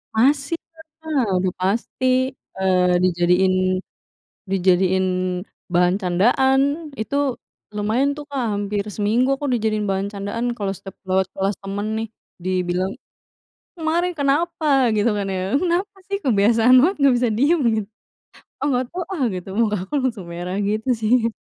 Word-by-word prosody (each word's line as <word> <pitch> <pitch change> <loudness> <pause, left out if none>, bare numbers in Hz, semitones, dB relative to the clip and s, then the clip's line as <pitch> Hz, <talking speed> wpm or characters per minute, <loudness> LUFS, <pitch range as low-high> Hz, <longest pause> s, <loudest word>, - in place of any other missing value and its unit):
Masih 280 +7 +2 0.5
lah, 290 -7 0
udah 185 0 0
pasti, 205 +7 -1 0.5
eee, 180 -1 +3
dijadiin 180 +1 +3 1.0
dijadiin 190 0 +2 0.7
bahan 180 +1 +3
candaan. 245 +9 +3 0.4
Itu 275 +3 -1 0.4
lumayan 230 +7 +1
tuh, 295 - -7
Kak, 275 -3 -2
hampir 205 0 -1
seminggu 235 +6 +2
aku 285 +1 -4
dijadiin 215 -2 0
bahan 195 +1 -1
candaan. 205 +4 -3
Kalau 200 -3 -2
setiap 195 +1 -11
lewat 190 0 +2
kelas 195 +1 -1
temen 200 +1 -4
nih, 225 0 -3 0.4
dibilang, 185 0 -1 0.8
"Kemarin 340 +2 0
kenapa?" 285 -2 +2
gitu 215 +2 +2
kan 200 -1 -2
ya. 190 +3 -2
"Kenapa 370 +3 -1
sih, 400 0 -1
kebiasaan 230 +1 +4
banget. 370 +7 +2
Nggak 280 -3 +4
bisa 245 - +2
diem" 300 +8 +3 0.2
git 215 -2 -2 0.8
"Ah, - - 0
nggak 255 -1 +1
tau, 360 - -4
ah" 295 - -1
gitu. 180 0 -6
Mukaku 210 -5 0
langsung 230 -8 -2
merah 175 +2 -5
gitu 215 +4 -1
sih. 230 0 +1
215 Hz, 135 wpm, -21 LUFS, 190-270 Hz, 1.0 s, kebiasaan